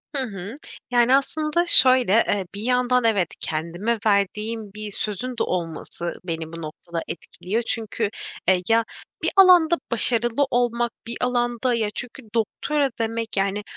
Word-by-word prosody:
Hı 270 Hz, -, +2 dB
hı. 200 Hz, 0 st, -7 dB, 0.4 s
Yani, 245 Hz, +2 st, +5 dB
aslında, 305 Hz, +4 st, 0 dB
şöyle, 255 Hz, -, +5 dB
eee, 195 Hz, -2 st, 0 dB
bir 205 Hz, -, -6 dB
yandan 250 Hz, +1 st, +2 dB
evet 205 Hz, -7 st, +2 dB
kendime 175 Hz, +9 st, -2 dB
verdiğim 210 Hz, +1 st, 0 dB
bir 210 Hz, -1 st, -6 dB
sözün 215 Hz, +5 st, -2 dB
de -, -, +1 dB
olması 170 Hz, 0 st, -4 dB
beni 165 Hz, -2 st, -4 dB
bu 165 Hz, -, -7 dB
noktada 165 Hz, +2 st, -6 dB
etkiliyor. 190 Hz, +6 st, -4 dB
Çünkü, 220 Hz, -1 st, -1 dB, 0.4 s
e, 190 Hz, -, +6 dB
ya, 225 Hz, 0 st, +4 dB, 0.4 s
bir -, -, +2 dB
alanda 355 Hz, -3 st, +7 dB, 0.2 s
başarılı 235 Hz, +3 st, +2 dB
olmak 240 Hz, -1 st, +1 dB, 0.2 s
bir 235 Hz, -, -4 dB
alanda 240 Hz, 0 st, 0 dB
ya 220 Hz, -3 st, 0 dB
çünkü 250 Hz, +2 st, -4 dB
doktora 280 Hz, +6 st, 0 dB
demek, 225 Hz, -1 st, -3 dB
yani, 200 Hz, +1 st, 0 dB
225 Hz, 145 wpm, -23 LUFS, 195-250 Hz, 0.4 s, alanda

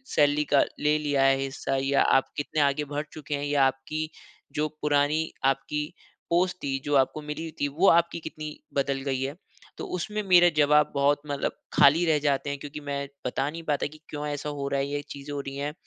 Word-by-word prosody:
Salary 145 Hz, 0 st, +4 dB
का 140 Hz, -, +7 dB, 0.2 s
ले 150 Hz, +1 st, +3 dB
लिया 145 Hz, -3 st, +1 dB
है 135 Hz, 0 st, +5 dB
हिस्सा 135 Hz, 0 st, -3 dB
या 140 Hz, +1 st, +2 dB
आप 135 Hz, -, +3 dB
कितने 150 Hz, +1 st, -1 dB
आगे 140 Hz, +1 st, +2 dB
बढ़ 145 Hz, +1 st, -2 dB
चुके 150 Hz, -1 st, -4 dB
हैं 140 Hz, 0 st, -3 dB
या 145 Hz, -1 st, +2 dB
आपकी 155 Hz, +4 st, -2 dB, 0.5 s
जो 150 Hz, +1 st, +1 dB
पुरानी 150 Hz, +2 st, +1 dB
आपकी 135 Hz, +2 st, 0 dB, 0.4 s
पोस्ट 180 Hz, +2 st, +2 dB
थी, 135 Hz, -1 st, -1 dB
जो 145 Hz, 0 st, +1 dB
आपको 135 Hz, +3 st, +2 dB
मिली 150 Hz, +2 st, -5 dB
हुई 165 Hz, -, -6 dB
थी, 145 Hz, -, +3 dB
वो 160 Hz, +8 st, +2 dB
आपकी 170 Hz, 0 st, +3 dB
कितनी 155 Hz, -1 st, -7 dB, 0.2 s
बदल 140 Hz, -1 st, 0 dB
गई 130 Hz, -1 st, -1 dB
है?" 140 Hz, +2 st, -3 dB, 0.4 s
तो -, -, -5 dB
उसमें 210 Hz, +4 st, -3 dB
मेरा 175 Hz, -2 st, +6 dB
जवाब 150 Hz, +1 st, +4 dB
बहुत 145 Hz, +1 st, +3 dB
मतलब 145 Hz, -1 st, -2 dB, 0.2 s
खाली 160 Hz, +5 st, +6 dB
रह 155 Hz, -2 st, +3 dB
जाते 140 Hz, +1 st, 0 dB
हैं 140 Hz, -1 st, -3 dB
क्योंकि 145 Hz, +1 st, -7 dB
मैं 140 Hz, 0 st, -2 dB, 0.2 s
बता 135 Hz, +3 st, -1 dB
नहीं 165 Hz, +2 st, -7 dB
पाता 145 Hz, -, -1 dB
कि -, -, -15 dB
क्यों 150 Hz, 0 st, -4 dB
ऐसा 145 Hz, 0 st, -3 dB
हो 140 Hz, -1 st, -4 dB
रहा 140 Hz, 0 st, 0 dB
है, 135 Hz, -, 0 dB
ये 145 Hz, 0 st, -2 dB
चीज़ें 140 Hz, +1 st, -7 dB
हो 145 Hz, -, -3 dB
रही 135 Hz, 0 st, -7 dB
हैं 145 Hz, +1 st, -3 dB
145 Hz, 215 wpm, -27 LUFS, 140-150 Hz, 0.5 s, का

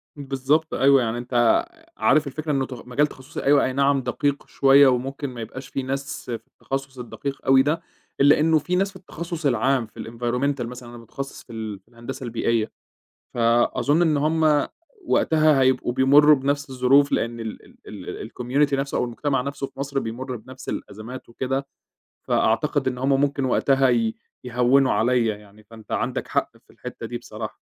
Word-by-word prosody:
بالضبط، 140 Hz, +2 st, 0 dB
أيوه، 135 Hz, 0 st, +5 dB
يعني 115 Hz, 0 st, -1 dB
أنت 120 Hz, -, +2 dB, 0.3 s
عارف 155 Hz, -1 st, +3 dB
الفكرة 150 Hz, +3 st, -4 dB
إنه 135 Hz, -2 st, +1 dB
تخ 125 Hz, -1 st, -10 dB
مجال 145 Hz, +4 st, +2 dB
تخصُّصي 130 Hz, +3 st, -9 dB
أيوة 140 Hz, 0 st, +4 dB
أينعم 140 Hz, +1 st, +2 dB
دقيق 140 Hz, +3 st, -2 dB
شوية، 140 Hz, 0 st, +6 dB
وممكن 135 Hz, +2 st, -1 dB
ما 120 Hz, -2 st, -8 dB
يبقاش 130 Hz, +4 st, -8 dB
فيه 135 Hz, -, -4 dB
ناس 135 Hz, +2 st, -4 dB
في 115 Hz, -2 st, -4 dB
التخصص 135 Hz, -1 st, -5 dB
الدقيق 135 Hz, +3 st, -5 dB
أوي 130 Hz, 0 st, +6 dB
ده، 155 Hz, +4 st, 0 dB, 0.4 s
إلا 145 Hz, +2 st, +6 dB
إنه 160 Hz, 0 st, +4 dB
فيه 180 Hz, +5 st, -1 dB
ناس 195 Hz, +2 st, +1 dB
في 195 Hz, -, -18 dB
التخصص 170 Hz, -3 st, -7 dB
العام، 130 Hz, 0 st, +2 dB
في -, -, -17 dB
الenvironmental 125 Hz, +4 st, -2 dB
مثلًا، 125 Hz, 0 st, -9 dB
أنا 120 Hz, -, -10 dB
متخصص 135 Hz, +4 st, -8 dB
في -, -, -13 dB
ال 110 Hz, -3 st, -5 dB
في -, -, -42 dB
الهندسة 125 Hz, +3 st, -8 dB
البيئية. 115 Hz, -1 st, -1 dB, 0.6 s
فأظن 120 Hz, +6 st, +2 dB
إن 160 Hz, -3 st, +3 dB
هُم 155 Hz, 0 st, +2 dB, 0.4 s
وقتها 155 Hz, -3 st, +3 dB
هيبقوا 130 Hz, -2 st, +2 dB
بيمُرّوا 145 Hz, +4 st, +6 dB
بنفس 140 Hz, +1 st, -2 dB
الظروف 135 Hz, +2 st, +3 dB
لأن 115 Hz, 0 st, -1 dB
ال 110 Hz, -1 st, -7 dB, 0.2 s
ال -, -, -9 dB
ال -, -, -7 dB
الcommunity 140 Hz, +4 st, 0 dB
نفسه 140 Hz, 0 st, -1 dB
أو -, -, +1 dB
المجتمع 135 Hz, +3 st, -1 dB
نفسه 140 Hz, 0 st, -4 dB
في -, -, -18 dB
مصر 140 Hz, 0 st, -2 dB
بيمُرّ 125 Hz, +2 st, -4 dB
بنفس 130 Hz, +4 st, -12 dB
الأزمات 110 Hz, +6 st, -7 dB
وكده، 135 Hz, +3 st, -3 dB, 0.6 s
فأعتقد -, -, +1 dB
إن 125 Hz, -1 st, -1 dB
هُم 135 Hz, +1 st, +2 dB
ممكن 140 Hz, -1 st, 0 dB
وقتها 135 Hz, +1 st, +3 dB
ي 115 Hz, -2 st, +1 dB, 0.3 s
يهوِّنوا 125 Hz, +2 st, +3 dB
عليَّ 120 Hz, +1 st, +2 dB
يعني، 105 Hz, 0 st, -7 dB
فانت 110 Hz, 0 st, -15 dB
عندك -, -, -2 dB
حق -, -, -1 dB, 0.2 s
في -, -, -20 dB
الحِتّة -, -, -8 dB
دي -, -, -4 dB
بصراحة، -, -, -8 dB
135 Hz, 175 wpm, -23 LUFS, 120-140 Hz, 0.6 s, شوية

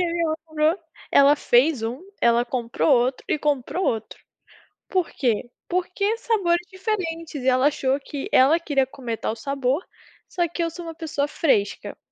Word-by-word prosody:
E -, -, +3 dB
aí 340 Hz, -1 st, -1 dB
ela 315 Hz, -, 0 dB
comprou 315 Hz, +3 st, +1 dB, 0.3 s
ela 280 Hz, +1 st, +6 dB
fez 260 Hz, -1 st, +3 dB
1, 235 Hz, +5 st, -3 dB, 0.2 s
ela 235 Hz, 0 st, +4 dB
comprou 245 Hz, +3 st, -1 dB
outro 255 Hz, +1 st, +2 dB
e -, -, +1 dB
comprou 295 Hz, +5 st, -1 dB
outro. 225 Hz, -6 st, -2 dB, 0.7 s
Por 370 Hz, -3 st, 0 dB
quê? 240 Hz, -2 st, -1 dB, 0.2 s
Porque 370 Hz, +5 st, -1 dB
sabores 355 Hz, -7 st, +1 dB
diferentes, 370 Hz, -5 st, -3 dB
e 260 Hz, -, -2 dB
ela 255 Hz, +2 st, +4 dB
achou, 275 Hz, -2 st, 0 dB
que 280 Hz, 0 st, -6 dB
ela 290 Hz, +6 st, +5 dB
queria 285 Hz, -5 st, +1 dB
comer, 245 Hz, -4 st, -5 dB
tal 220 Hz, -, -2 dB
sabor, 275 Hz, +4 st, -1 dB, 0.4 s
só 350 Hz, -1 st, 0 dB
que 340 Hz, +1 st, -3 dB
eu 335 Hz, -, 0 dB
sou 340 Hz, +1 st, -9 dB
uma 330 Hz, -1 st, -7 dB
pessoa 310 Hz, -3 st, -2 dB
fresca. 205 Hz, -11 st, 0 dB
295 Hz, 170 wpm, -23 LUFS, 255-340 Hz, 0.7 s, ela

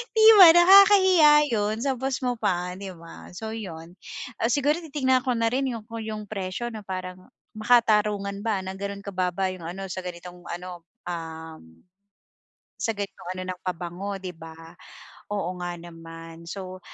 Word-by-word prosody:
'Di 440 Hz, -1 st, +5 dB, 0.2 s
ba 360 Hz, -, +12 dB
nakakahiya 375 Hz, -2 st, +7 dB, 0.2 s
yun 210 Hz, 0 st, 0 dB
sa 270 Hz, -, +1 dB
bus 265 Hz, +1 st, -2 dB
mo 245 Hz, -, +1 dB
pa 180 Hz, -5 st, -2 dB
'di 195 Hz, +1 st, -8 dB
ba 165 Hz, 0 st, -13 dB
so 220 Hz, +5 st, -7 dB
yun, 170 Hz, -6 st, -8 dB, 0.5 s
ah, 230 Hz, -, +2 dB
siguro 290 Hz, +6 st, +1 dB
titignan 260 Hz, -5 st, +1 dB
ko 250 Hz, -3 st, -1 dB
na 230 Hz, 0 st, 0 dB
rin 265 Hz, 0 st, 0 dB
yung, 225 Hz, -3 st, -6 dB
kung 230 Hz, 0 st, -7 dB
yung 215 Hz, -1 st, -6 dB
presyo 195 Hz, +2 st, -5 dB
na 215 Hz, -, -7 dB
parang 185 Hz, 0 st, -7 dB, 0.2 s
makatarungan 210 Hz, -3 st, +2 dB
ba 210 Hz, -3 st, -1 dB
na 190 Hz, -, -5 dB
gano'n 200 Hz, +1 st, -6 dB
kababa 185 Hz, -1 st, -1 dB
yung 180 Hz, -3 st, -10 dB
ano 190 Hz, +3 st, -6 dB
sa 185 Hz, 0 st, -5 dB
ganitong 180 Hz, 0 st, -9 dB
ano, 175 Hz, 0 st, -7 dB, 0.2 s
uhm. 160 Hz, -, -8 dB, 1.0 s
Sa 225 Hz, -, +1 dB
gan'to 200 Hz, -2 st, -5 dB
ng -, -, -10 dB
ano -, -, -4 dB
ng 180 Hz, -, -19 dB
pabango 185 Hz, +2 st, -5 dB
'di 180 Hz, -2 st, -7 dB
ba 165 Hz, 0 st, -12 dB, 0.5 s
oo 200 Hz, -4 st, -3 dB
nga 175 Hz, 0 st, -4 dB
naman 165 Hz, -1 st, -11 dB
so 185 Hz, 0 st, -7 dB
195 Hz, 165 wpm, -25 LUFS, 175-230 Hz, 1.0 s, ba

